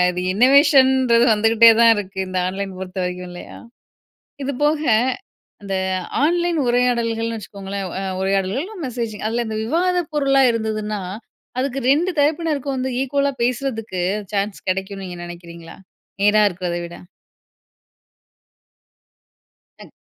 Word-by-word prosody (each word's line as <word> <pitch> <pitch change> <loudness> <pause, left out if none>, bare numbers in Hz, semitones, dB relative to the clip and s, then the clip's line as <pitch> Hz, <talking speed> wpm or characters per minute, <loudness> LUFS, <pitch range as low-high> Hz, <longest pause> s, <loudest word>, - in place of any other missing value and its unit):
இது 180 - -4
இன்னொவேஷன்றது 260 -1 +5
வந்துகிட்டே 225 +2 +6
தான் 230 -1 +7
இருக்கு 195 -1 -6
இந்த 185 0 -2
ஆன்லைன் 195 +1 -4
பொறுத்த 190 0 -8
வரைக்கும், 180 0 -5
இல்லையா? 175 - -10 0.9
இது 280 +1 -2
போக, 300 +1 +1 0.8
அந்த 195 -1 -4 0.5
ஆன்லைன் 345 +1 +1
உரையாடல்கள்னு 235 -2 0
வச்சுக்கோங்களேன். 200 -1 -6
அ - - -4 0.2
உரையாடல்கள் 195 +5 0
இல்ல 430 +4 -10
மெசேஜிங். 230 -4 -5
அதுல 235 +2 -1
இந்த 220 0 -3
விவாத 360 +7 +1 0.2
பொருள்லா 275 -2 +3
இருந்ததுன்னா, 215 -2 -3 0.6
அதுக்கு 270 0 -1
2 335 +6 +1
தரப்பினருக்கும் 295 -2 0
வந்து 260 0 -2
ஈக்குவலா 280 +1 0
பேசுறக்கு 240 -6 -2 0.3
சான்ஸ் 200 0 -2
கிடைக்கும்னு 195 +1 -4
நீங்க 175 -1 -8
நினைக்கிறீங்களா, 170 -1 -11 0.5
நேரா 210 +1 +5
இருக்கிறத 180 -2 -4
விட? 170 - -11 2.9
டக் - - -13
230 Hz, 115 wpm, -20 LUFS, 195-270 Hz, 2.9 s, தான்